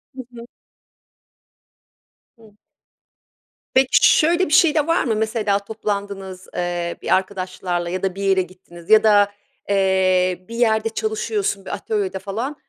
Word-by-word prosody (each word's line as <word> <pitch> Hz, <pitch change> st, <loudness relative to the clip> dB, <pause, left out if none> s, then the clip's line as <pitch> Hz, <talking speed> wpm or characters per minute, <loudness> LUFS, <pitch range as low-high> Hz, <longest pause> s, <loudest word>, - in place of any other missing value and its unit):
Hı 260 Hz, -, -6 dB
hı. 235 Hz, 0 st, -9 dB, 1.9 s
Hı. 220 Hz, -2 st, -19 dB, 1.2 s
Peki, 260 Hz, 0 st, +4 dB, 0.2 s
şöyle 340 Hz, +4 st, +3 dB
bir 300 Hz, -, -3 dB
şey 335 Hz, -4 st, +5 dB
de 305 Hz, 0 st, +1 dB
var 330 Hz, -, +2 dB
mı? 225 Hz, -4 st, -1 dB
Mesela 215 Hz, -2 st, 0 dB
toplandınız, 200 Hz, -3 st, -5 dB
eee, 175 Hz, -1 st, -3 dB
bir -, -, +2 dB
arkadaşlarla 185 Hz, -2 st, -3 dB
ya 185 Hz, +2 st, -4 dB
da 190 Hz, -1 st, -1 dB
bir 200 Hz, -, -5 dB
yere 195 Hz, -1 st, +3 dB
gittiniz 180 Hz, -2 st, -13 dB
ya 220 Hz, 0 st, +6 dB
da, 205 Hz, -1 st, +4 dB, 0.4 s
eee, 185 Hz, -2 st, +1 dB
bir 230 Hz, -, -8 dB
yerde 225 Hz, -2 st, +1 dB
çalışıyorsun, 215 Hz, -3 st, -2 dB
bir -, -, -6 dB
atölyede 195 Hz, -3 st, -3 dB
falan. 225 Hz, +9 st, -4 dB
200 Hz, 135 wpm, -20 LUFS, 185-225 Hz, 1.9 s, ya